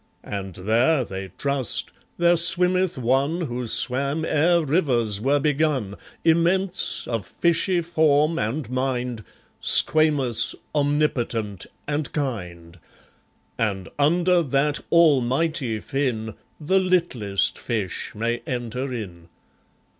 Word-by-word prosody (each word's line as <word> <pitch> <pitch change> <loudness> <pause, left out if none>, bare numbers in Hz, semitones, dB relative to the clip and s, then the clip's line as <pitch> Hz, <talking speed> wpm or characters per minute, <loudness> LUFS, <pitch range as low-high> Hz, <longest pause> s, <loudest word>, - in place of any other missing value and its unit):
And 95 -3 -6
there 120 - +1
(they 95 -1 -6
trust) 140 -3 -1 0.3
there 175 0 +4
swimmeth 180 +1 +4
One 135 +7 0
Who 125 -6 -4
swam 140 +7 0
ere 165 +2 +2
rivers 120 - 0
were 140 +4 +2
begun, 140 -8 0 0.3
Immense, 175 +3 +1
of 115 -4 -2
fishy 170 - 0
form 160 -2 +2
and 115 +5 -3
mind, 125 -3 -2 0.4
Squamous, 145 -7 +3 0.2
omnipotent, 130 - -1 0.2
and 150 0 -2
kind; 90 - -5 0.8
And 95 -6 -2
under 175 +4 +3
that 145 0 0
Almighty 145 -5 +2
Fin, 120 -5 -3 0.3
The 190 +5 +2
littlest 170 - 0
fish 105 -7 -4
may 115 +2 -2
enter 125 0 -4
in. 90 -8 -7
135 Hz, 100 wpm, -23 LUFS, 115-160 Hz, 0.8 s, there